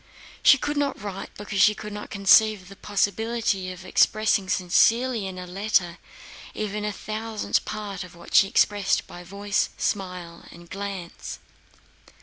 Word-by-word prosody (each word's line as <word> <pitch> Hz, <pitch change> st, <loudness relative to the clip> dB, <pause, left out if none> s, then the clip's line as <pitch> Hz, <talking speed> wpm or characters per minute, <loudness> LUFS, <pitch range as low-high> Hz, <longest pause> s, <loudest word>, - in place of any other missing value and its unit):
She 275 Hz, -, +7 dB
could 290 Hz, +2 st, -3 dB
not 285 Hz, -1 st, -1 dB
write, 195 Hz, -1 st, -6 dB
because 200 Hz, -1 st, -2 dB
she 210 Hz, +2 st, +6 dB
could 210 Hz, 0 st, -8 dB
not 210 Hz, -, -7 dB
conceive 200 Hz, 0 st, +4 dB
the 195 Hz, -, -11 dB
possibility 205 Hz, -1 st, -1 dB
of 185 Hz, 0 st, -10 dB
expressing 215 Hz, 0 st, +2 dB
sincerely 225 Hz, +5 st, +2 dB
in 185 Hz, -1 st, -7 dB
a 180 Hz, -, -6 dB
letter 180 Hz, -2 st, 0 dB, 0.6 s
even 210 Hz, 0 st, -3 dB
a 210 Hz, -, -1 dB
thousandth 215 Hz, +2 st, -2 dB
part 205 Hz, -3 st, -5 dB
of 180 Hz, -1 st, -13 dB
what 170 Hz, -, -13 dB
she 195 Hz, -, +7 dB
expressed 205 Hz, 0 st, +2 dB
by 175 Hz, -, -11 dB
voice, 200 Hz, +3 st, -1 dB
smile, 180 Hz, -4 st, -4 dB
and 170 Hz, 0 st, -14 dB
glance. 195 Hz, -2 st, -6 dB
200 Hz, 145 wpm, -25 LUFS, 185-215 Hz, 0.6 s, She